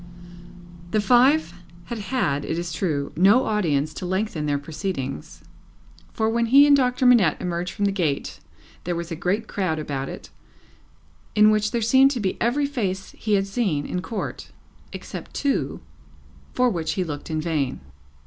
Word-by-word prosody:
The 215 - +1
five 250 - +4 0.3
had 235 +3 -5
had, 185 - -1
it 160 - -3
is 170 -1 -4
true, 150 -6 -2
no 200 +9 +5
audience 155 -8 0
to - - -6
lengthen 185 -5 -2
their 145 -1 +1
proceedings, 140 - -5 0.7
for 220 - -1
when 235 +1 +1
he 275 +5 +7
and 290 -1 +6
Doctor 255 -1 +1
Manette 230 -11 +5
emerged 175 0 -3
from 205 0 -1
the 200 - +2
gate, 165 -8 -2 0.4
there 175 0 -2
was 170 0 -5
a - - -2
great 190 +7 -1
crowd 185 -6 -1
about 140 -3 -4
it, - - -9 1.0
in 210 0 +6
which 210 0 +1
there 235 -1 -1
seemed 265 +4 +5
to 270 -3 -2
be 195 -4 -1
every 265 +5 +1
face 200 -9 -3
he 215 -2 -1
had 195 0 +1
seen 195 - -1
in 180 - -3
Court 220 +3 -5 0.4
except - - -8
two, 280 -1 -1 0.7
for 250 0 +2
which 170 -8 -1
he 185 - -1
looked 150 -3 -6
in 155 -1 -1
vain. 155 -5 -1
195 Hz, 170 wpm, -23 LUFS, 160-235 Hz, 1.0 s, he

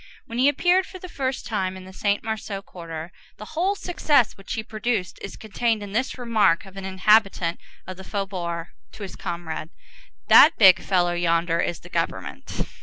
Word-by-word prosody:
When 230 +1 -5
he 265 +3 +6
appeared 355 +6 +2
for 375 - -9
the 365 - -9
first 265 -6 -3
time 190 -4 -2
in 185 - -10
the 190 - -12
Saint 205 +1 0
Marceau 215 -3 -4
quarter, 165 -2 -8 0.3
the 215 - -8
whole 365 +5 +1
success 300 - +1
which 195 - -7
he 220 -3 -3
produced 215 -4 -2
is 195 - -7
contained 220 0 -1
in 200 - -8
this 255 +6 -1
remark 225 -9 +2
of 195 0 -14
an 195 -1 -6
inhabitant 190 -2 +2 0.3
of 185 0 -8
the 190 - -9
faubourg 180 -4 -4 0.2
to 210 - -9
his 190 - -7
comrade, 170 -3 -5 0.6
"That 320 - +8
big 190 -4 +8
fellow 175 -2 +1
yonder 170 -1 +1
is 170 - -2
the - - -13
government." - - -3
195 Hz, 180 wpm, -24 LUFS, 180-235 Hz, 0.6 s, That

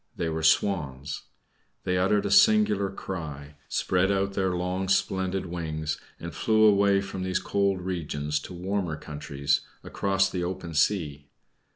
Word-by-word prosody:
They 85 - -2
were 80 0 -2
Swans. 75 -5 +1 0.6
They 90 - 0
uttered 100 +2 +2
a - - -1
singular 205 - +5
cry, 75 -7 -7
spread 95 +1 +1
out 100 0 0
their 95 -1 +1
long 90 +2 -2
splendid 95 -1 0
wings, 80 -3 -4 0.2
and 85 -2 -7
flew 110 +5 +2
away 100 -2 +5
from 95 -1 -6
these 95 0 0
cold 100 -2 0
regions 75 -5 -2
to - - -8
warmer 90 -3 -2
countries, 70 -2 -2 0.2
across 95 0 +1
the 90 -2 -3
open 90 -2 -4
sea. 75 -4 0
90 Hz, 145 wpm, -27 LUFS, 80-95 Hz, 0.6 s, singular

